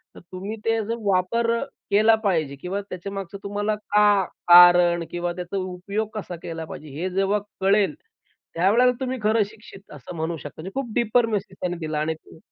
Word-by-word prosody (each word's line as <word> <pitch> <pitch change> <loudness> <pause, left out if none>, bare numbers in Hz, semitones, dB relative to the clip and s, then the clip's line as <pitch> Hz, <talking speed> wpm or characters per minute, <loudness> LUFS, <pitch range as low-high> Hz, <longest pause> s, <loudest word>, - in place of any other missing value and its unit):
तर - - -11
तुम्ही 195 +4 -5
ते 225 0 +2
जर 230 - -2 0.2
वापर 230 +6 +1
अ, - - -2 0.3
केला 215 +2 +5
पाहिजे 160 -8 0
किंवा 180 +7 -4
त्याच्यामागचं 195 +1 -6
तुम्हाला 205 +1 -1
का 210 -1 +3 0.2
कारण 175 -1 +8
किंवा 175 0 -2
त्याचा 180 +2 -5
उपयोग 190 +3 -3
कसा 200 -5 -5
केला 165 -1 -5
पाहिजे? 155 -1 -9
हे 185 - -1
जेव्हा 195 +2 +1 0.2
कळेल, 195 +1 +3 0.6
त्यावेळेला 220 +9 +4
तुम्ही 260 0 -2
खरं 215 0 +3
शिक्षित 200 -2 -15
असं 145 +4 -10
म्हणू 160 +1 -3
शकता. 145 - -9
म्हणजे 190 - -7
खूप 240 -5 -5
डीपर 235 0 +3
मेसेज 205 -4 -3
त्यांनी 180 -1 -2
दिला 155 -2 -3
आणि 155 +1 0
ते 160 - -17
195 Hz, 175 wpm, -24 LUFS, 175-210 Hz, 0.6 s, कारण